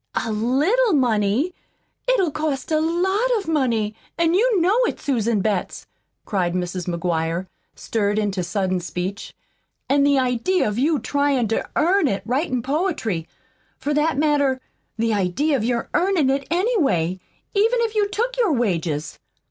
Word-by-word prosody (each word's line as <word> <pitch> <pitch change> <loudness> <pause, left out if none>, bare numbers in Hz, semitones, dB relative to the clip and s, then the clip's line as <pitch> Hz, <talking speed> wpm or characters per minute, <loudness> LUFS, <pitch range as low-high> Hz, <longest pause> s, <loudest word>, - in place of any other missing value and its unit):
'"A 225 - -1
little 295 - +2
money'! 245 - +1 0.6
It'll 380 -10 +2
cost 305 -1 -3
a 310 - +3
lot 380 +8 +1
of 395 - -5
money, 235 -9 0 0.2
an' 335 0 +2
you 435 +2 +3
know 365 +5 +3
it, - - -4
Susan 230 -6 0
Betts," 200 -3 -2 0.4
cried 180 -4 -1
Mrs. 180 0 -3
McGuire, 170 0 -1 0.3
stirred 205 -2 -1
into 200 -3 0
sudden 185 +1 -1
speech. 180 +3 -5 0.5
"An' 280 +1 +3
the 280 0 +4
idea 255 +8 +1
of 210 +2 -2
you 305 +4 +2
tryin' 280 -2 +1
to 225 - -1
EARN 350 +1 +3
it 200 -5 -2
writin' 255 -1 -1
poetry. 270 - -1 0.5
For 295 +2 -2
that 300 0 +1
matter, 285 -3 +2 0.4
the 225 0 +1
idea 205 - +1
of 240 - -1
your 235 0 -1
earnin' 345 -7 +2
it, 275 0 -2
anyway, 295 - +1 0.3
even 450 +4 +3
if 455 -2 0
you 420 -2 +2
took 475 +5 -1
your 430 -10 +3
wages." 165 - -1
265 Hz, 150 wpm, -22 LUFS, 205-330 Hz, 0.6 s, the